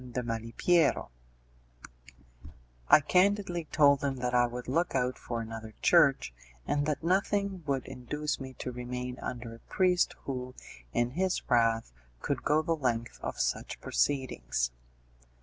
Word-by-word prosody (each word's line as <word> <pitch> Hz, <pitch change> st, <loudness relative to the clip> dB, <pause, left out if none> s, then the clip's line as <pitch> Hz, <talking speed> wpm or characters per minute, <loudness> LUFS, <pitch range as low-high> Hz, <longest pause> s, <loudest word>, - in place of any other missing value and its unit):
de 125 Hz, -, -1 dB
Malipiero; 120 Hz, +8 st, +1 dB, 1.8 s
I -, -, +8 dB
candidly 180 Hz, +1 st, +2 dB
told 145 Hz, -2 st, +4 dB
him 140 Hz, -1 st, 0 dB
that 125 Hz, -1 st, -2 dB
I 120 Hz, 0 st, +4 dB
would 125 Hz, +1 st, -7 dB
look 165 Hz, +6 st, 0 dB
out 125 Hz, -1 st, 0 dB
for 120 Hz, -1 st, -4 dB
another 110 Hz, -1 st, -8 dB
church, -, -, +4 dB, 0.3 s
and 145 Hz, 0 st, 0 dB
that 150 Hz, 0 st, -1 dB
nothing 195 Hz, +1 st, +1 dB
would 135 Hz, -2 st, 0 dB
induce 135 Hz, +4 st, -4 dB
me 130 Hz, -1 st, -7 dB
to 125 Hz, -, -5 dB
remain 125 Hz, 0 st, -5 dB
under 120 Hz, -2 st, -5 dB
a 115 Hz, -, -12 dB
priest 180 Hz, -, +1 dB
who, 130 Hz, -1 st, -5 dB, 0.4 s
in 120 Hz, -, 0 dB
his 185 Hz, +5 st, -1 dB
wrath, 115 Hz, -, +2 dB, 0.3 s
could -, -, -2 dB
go 155 Hz, +1 st, +2 dB
the 165 Hz, +1 st, +1 dB
length 120 Hz, -6 st, -2 dB
of -, -, -5 dB
such -, -, -2 dB
proceedings. 65 Hz, -, -1 dB
130 Hz, 140 wpm, -30 LUFS, 120-155 Hz, 1.8 s, I